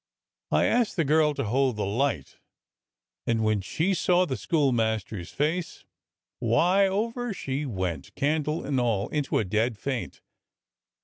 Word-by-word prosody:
I -, -, +3 dB
asked 240 Hz, -2 st, +2 dB
the 165 Hz, -5 st, +1 dB
girl 150 Hz, +1 st, +3 dB
to 140 Hz, -, -2 dB
hold 130 Hz, +2 st, +1 dB
the 105 Hz, -, -2 dB
light, 105 Hz, -, -1 dB, 0.9 s
and 115 Hz, -1 st, +1 dB
when 110 Hz, -2 st, +1 dB
she 165 Hz, -, 0 dB
saw 180 Hz, 0 st, +3 dB
the 135 Hz, -, -2 dB
schoolmaster's 110 Hz, -, 0 dB
face, 160 Hz, -, -2 dB, 0.5 s
why, 175 Hz, -, +3 dB
over 230 Hz, +3 st, -2 dB
she 140 Hz, 0 st, -3 dB
went, 90 Hz, -, -4 dB
candle 150 Hz, +2 st, 0 dB
and 135 Hz, -2 st, 0 dB
all, 110 Hz, -5 st, 0 dB
into 150 Hz, -3 st, -1 dB
a 110 Hz, -, +1 dB
dead 110 Hz, +4 st, 0 dB
faint. 130 Hz, +1 st, -4 dB
135 Hz, 140 wpm, -27 LUFS, 110-160 Hz, 0.9 s, I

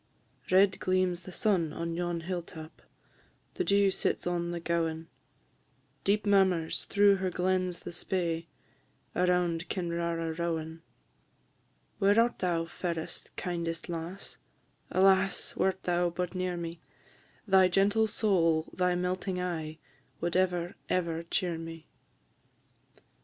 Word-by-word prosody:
"_ -, -, -7 dB
Red 190 Hz, +1 st, +5 dB
gleams 185 Hz, -1 st, +1 dB
the 185 Hz, +1 st, -11 dB
sun 180 Hz, -5 st, +1 dB
on 170 Hz, +2 st, -3 dB
yon 175 Hz, 0 st, -2 dB
hill 175 Hz, +1 st, -3 dB
tap, 160 Hz, -1 st, -11 dB, 0.7 s
The 370 Hz, -, -1 dB
dew 200 Hz, -, +4 dB
sits -, -, -1 dB
on 175 Hz, -1 st, -1 dB
the 175 Hz, 0 st, -3 dB
gowan; 165 Hz, -1 st, -1 dB, 0.9 s
Deep 205 Hz, +2 st, +2 dB
murmurs 190 Hz, -5 st, +2 dB
through 200 Hz, -1 st, +4 dB
her 190 Hz, 0 st, -1 dB
glens 185 Hz, 0 st, 0 dB
the -, -, -7 dB
Spey, 170 Hz, -2 st, -2 dB, 0.7 s
Around 180 Hz, -1 st, +1 dB
Kinrara 170 Hz, -2 st, -2 dB
rowan. 165 Hz, -1 st, -2 dB, 1.2 s
Where 205 Hz, +2 st, +5 dB
art 235 Hz, +1 st, +2 dB
thou, 170 Hz, -2 st, 0 dB
fairest, 165 Hz, -1 st, -4 dB
kindest 170 Hz, -2 st, -3 dB
lass? 170 Hz, +3 st, -6 dB, 0.5 s
Alas! 190 Hz, 0 st, +3 dB
wert 190 Hz, 0 st, 0 dB
thou 175 Hz, 0 st, +1 dB
but 180 Hz, +1 st, -3 dB
near 185 Hz, -1 st, -2 dB
me, 170 Hz, 0 st, -6 dB, 0.7 s
Thy 190 Hz, -1 st, +6 dB
gentle 200 Hz, +4 st, +3 dB
soul, 165 Hz, -7 st, +1 dB
thy 180 Hz, -1 st, +1 dB
melting 180 Hz, +1 st, -2 dB
eye, 160 Hz, -3 st, -3 dB, 0.4 s
Would 170 Hz, +1 st, -2 dB
ever, 180 Hz, -1 st, +1 dB, 0.2 s
ever 170 Hz, -2 st, 0 dB
cheer 175 Hz, -3 st, 0 dB
me. 165 Hz, -1 st, -8 dB
175 Hz, 125 wpm, -30 LUFS, 165-185 Hz, 1.2 s, Thy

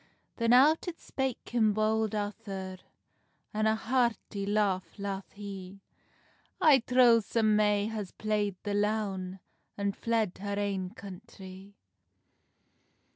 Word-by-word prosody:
Then 230 Hz, -1 st, +2 dB
out 290 Hz, +8 st, +5 dB
it 340 Hz, -1 st, -5 dB
spake 265 Hz, -2 st, -4 dB
him 220 Hz, -3 st, +3 dB
Bold 215 Hz, 0 st, +1 dB
Arthur, 195 Hz, -2 st, -5 dB, 0.7 s
An 215 Hz, +1 st, +1 dB
a 220 Hz, -, +3 dB
hearty 230 Hz, -4 st, -1 dB
laugh 200 Hz, -4 st, 0 dB
laugh 200 Hz, -1 st, -4 dB
he: 195 Hz, -2 st, -8 dB, 0.8 s
"I 305 Hz, -7 st, +6 dB
trow 245 Hz, -1 st, +5 dB
some 215 Hz, 0 st, +1 dB
may 210 Hz, -1 st, +3 dB
has 215 Hz, -4 st, -4 dB
playd 210 Hz, -2 st, -1 dB
the 205 Hz, -, -2 dB
loun, 205 Hz, -3 st, -1 dB, 0.4 s
And 200 Hz, 0 st, -1 dB
fled 225 Hz, -5 st, -1 dB
her 200 Hz, 0 st, -3 dB
ain 195 Hz, -2 st, -1 dB
country." 195 Hz, -2 st, -11 dB
210 Hz, 120 wpm, -30 LUFS, 195-225 Hz, 0.8 s, I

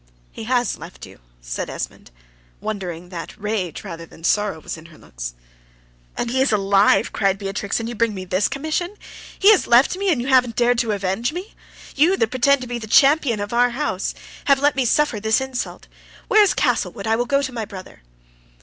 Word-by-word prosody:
"He 225 Hz, -, -8 dB
has 245 Hz, 0 st, 0 dB
left 165 Hz, +3 st, -10 dB
you," -, -, -15 dB, 0.2 s
says -, -, -5 dB
Esmond, -, -, -6 dB, 0.5 s
wondering 180 Hz, -5 st, -5 dB
that 180 Hz, +4 st, -8 dB
rage 210 Hz, -5 st, -3 dB
rather 165 Hz, -5 st, -7 dB
than 165 Hz, -, -17 dB
sorrow 205 Hz, -2 st, +1 dB
was -, -, -6 dB
in 160 Hz, 0 st, -13 dB
her 160 Hz, -2 st, -17 dB
looks. -, -, -8 dB, 0.8 s
"And 235 Hz, -, -2 dB
he 260 Hz, +1 st, +1 dB
is 270 Hz, -, +2 dB
alive," 195 Hz, 0 st, +3 dB
cried 195 Hz, -2 st, +1 dB
Beatrix, 200 Hz, +1 st, -3 dB
"and 230 Hz, -, -4 dB
you 240 Hz, -, -4 dB
bring 230 Hz, -1 st, 0 dB
me 185 Hz, -1 st, -6 dB
this 185 Hz, +2 st, +1 dB
commission! 315 Hz, +7 st, -3 dB, 0.4 s
He 405 Hz, +2 st, +7 dB
has 415 Hz, -, +3 dB
left 245 Hz, +8 st, +5 dB
me, 390 Hz, 0 st, 0 dB
and 290 Hz, -, +1 dB
you 240 Hz, -, -3 dB
haven't 250 Hz, -3 st, +3 dB
dared 245 Hz, 0 st, +2 dB
to 230 Hz, -3 st, 0 dB
avenge 200 Hz, +5 st, -1 dB
me! 365 Hz, +5 st, -7 dB, 0.4 s
You, 335 Hz, +7 st, +4 dB
that 225 Hz, -, 0 dB
pretend 265 Hz, +2 st, +3 dB
to 250 Hz, -, -6 dB
be 240 Hz, 0 st, -4 dB
the 220 Hz, -, -8 dB
champion 275 Hz, -1 st, +4 dB
of 205 Hz, +2 st, -4 dB
our 245 Hz, +1 st, +4 dB
house, 240 Hz, -7 st, -2 dB, 0.3 s
have 275 Hz, -1 st, +4 dB
let 285 Hz, 0 st, +2 dB
me 265 Hz, -2 st, +1 dB
suffer 260 Hz, -2 st, +2 dB
this 220 Hz, +1 st, +2 dB
insult! 265 Hz, -1 st, -5 dB, 0.4 s
Where 430 Hz, -, +6 dB
is 410 Hz, -, +3 dB
Castlewood? 230 Hz, -8 st, 0 dB
I 220 Hz, 0 st, +2 dB
will 240 Hz, +2 st, 0 dB
go 275 Hz, +2 st, +2 dB
to 260 Hz, -, -4 dB
my 225 Hz, -2 st, -3 dB
brother." 195 Hz, -3 st, -11 dB
230 Hz, 205 wpm, -21 LUFS, 195-265 Hz, 0.8 s, He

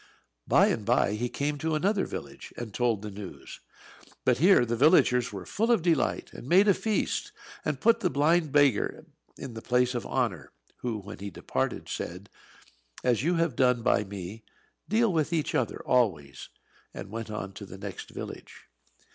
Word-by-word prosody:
By -, -, +5 dB
and 110 Hz, -, -1 dB
by 115 Hz, -1 st, +2 dB
he 120 Hz, +3 st, -2 dB
came 145 Hz, +2 st, -2 dB
to 160 Hz, +1 st, -1 dB
another 195 Hz, +6 st, +1 dB
village, -, -, -8 dB
and 115 Hz, -4 st, -6 dB
told 115 Hz, -3 st, 0 dB
the 105 Hz, -, -5 dB
news. 100 Hz, -1 st, -9 dB, 0.7 s
But 125 Hz, -1 st, +3 dB
here 175 Hz, -5 st, +6 dB
the 120 Hz, 0 st, -1 dB
villagers 125 Hz, -2 st, +4 dB
were 95 Hz, -3 st, -7 dB
full 225 Hz, -, -1 dB
of 220 Hz, -8 st, +3 dB
delight, 165 Hz, -5 st, +1 dB
and 125 Hz, -, -9 dB
made 190 Hz, +4 st, +6 dB
a 200 Hz, -, +6 dB
feast, 215 Hz, +2 st, -1 dB, 0.3 s
and -, -, -2 dB
put 230 Hz, 0 st, +4 dB
the 185 Hz, -, +1 dB
blind 155 Hz, +1 st, +2 dB
beggar 140 Hz, -7 st, +2 dB, 0.3 s
in 125 Hz, -, -7 dB
the 110 Hz, -, -7 dB
place 125 Hz, +1 st, +2 dB
of 120 Hz, -, -3 dB
honour; 100 Hz, -, -2 dB, 0.2 s
who, 120 Hz, -3 st, -3 dB
when 100 Hz, 0 st, -9 dB
he 100 Hz, +1 st, -5 dB
departed, -, -, -3 dB
said, 90 Hz, +4 st, -6 dB, 0.7 s
"As 125 Hz, -2 st, +2 dB
you 170 Hz, +6 st, +1 dB
have 165 Hz, -6 st, 0 dB
done 125 Hz, -2 st, +2 dB
by 105 Hz, -, +3 dB
me, 100 Hz, +2 st, -8 dB, 0.5 s
deal 220 Hz, -1 st, +3 dB
with 155 Hz, -1 st, 0 dB
each 160 Hz, -3 st, -1 dB
other -, -, -1 dB
always!" 80 Hz, -, 0 dB, 0.5 s
and -, -, -8 dB
went 115 Hz, 0 st, -5 dB
on 100 Hz, -2 st, -5 dB
to 100 Hz, +1 st, -9 dB
the 95 Hz, -, -10 dB
next 100 Hz, -2 st, -7 dB
village. -, -, -9 dB
125 Hz, 180 wpm, -28 LUFS, 105-160 Hz, 0.7 s, here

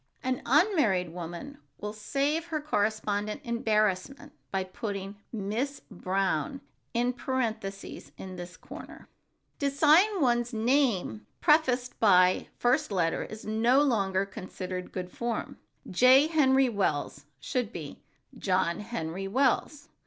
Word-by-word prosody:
An 255 Hz, 0 st, -1 dB
unmarried 260 Hz, -, +3 dB
woman 175 Hz, -, -7 dB, 0.2 s
will 210 Hz, 0 st, -5 dB
save 280 Hz, +9 st, -1 dB
her 320 Hz, -2 st, -2 dB
correspondent 210 Hz, -6 st, -1 dB
embarrassment 230 Hz, +3 st, 0 dB, 0.2 s
by 195 Hz, -1 st, -1 dB
putting 195 Hz, 0 st, -5 dB
"Miss 225 Hz, +7 st, -3 dB
Brown" 195 Hz, -, -1 dB, 0.3 s
in 245 Hz, +1 st, +1 dB
parentheses 225 Hz, -7 st, -4 dB
in 185 Hz, -1 st, -8 dB
this 180 Hz, 0 st, -8 dB
corner. -, -, -11 dB, 0.5 s
To 280 Hz, -, +1 dB
sign 320 Hz, +9 st, +4 dB
one's 240 Hz, -3 st, +1 dB
name 220 Hz, -, +1 dB
prefaced 260 Hz, -6 st, +2 dB
by 185 Hz, -4 st, +5 dB
the -, -, -37 dB
first 245 Hz, +1 st, +2 dB
letter 170 Hz, -4 st, 0 dB
is 215 Hz, 0 st, -9 dB
no 235 Hz, +6 st, +3 dB
longer 195 Hz, -7 st, +1 dB
considered 185 Hz, -2 st, -6 dB
good 180 Hz, -1 st, -5 dB
form. 235 Hz, -2 st, -4 dB, 0.3 s
"J. 255 Hz, +9 st, +6 dB
Henry 270 Hz, -4 st, +4 dB
Wells" 190 Hz, -11 st, -1 dB
should 235 Hz, -, -2 dB
be 155 Hz, -8 st, -8 dB, 0.3 s
"John 185 Hz, -3 st, 0 dB
Henry 195 Hz, -4 st, -4 dB
Wells." 275 Hz, +5 st, 0 dB
220 Hz, 120 wpm, -28 LUFS, 190-270 Hz, 0.5 s, J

